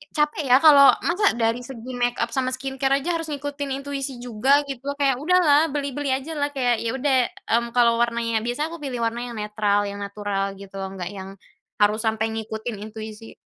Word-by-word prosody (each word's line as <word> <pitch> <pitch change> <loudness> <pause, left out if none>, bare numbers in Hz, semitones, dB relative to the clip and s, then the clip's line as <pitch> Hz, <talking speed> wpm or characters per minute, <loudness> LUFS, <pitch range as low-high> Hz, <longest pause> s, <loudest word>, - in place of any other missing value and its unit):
capek 300 0 +1
ya 255 - +8
kalau 285 -3 +9
masa 390 +5 +2
dari 230 +1 +1
segi 255 -1 -9
makeup 245 -1 0
sama 255 -1 0
skin 265 +1 -4
care 270 0 +3
aja 345 +3 -1
harus 325 -1 -5
ngikutin 285 0 -4
intuisi 275 -2 -4
juga 250 +4 +2
gitu 265 -2 -5
loh - - -6
kayak 270 -3 +2
udahlah 320 -3 +4
beli-beli 280 -1 -2
ajalah 290 +2 -2
kayak 245 -3 +2
ya 225 - 0
udah, 270 0 +2 0.3
mmm, 235 +1 +2
kalau 235 -1 +4
warnanya 235 -1 0
biasa 295 +6 -2
aku 335 - -6
pilih 250 -4 -4
warna 235 +1 -2
yang - - -9
netral 210 -1 0
yang 200 - -7
natural 200 -1 -3
gitu 195 0 -10
nggak 190 -2 -5
yang 190 -1 -8 0.5
harus 210 +2 +4
sampai 220 0 +1
ngikutin 220 0 -5
intuisi. 220 0 -9
245 Hz, 185 wpm, -23 LUFS, 220-280 Hz, 0.5 s, kalau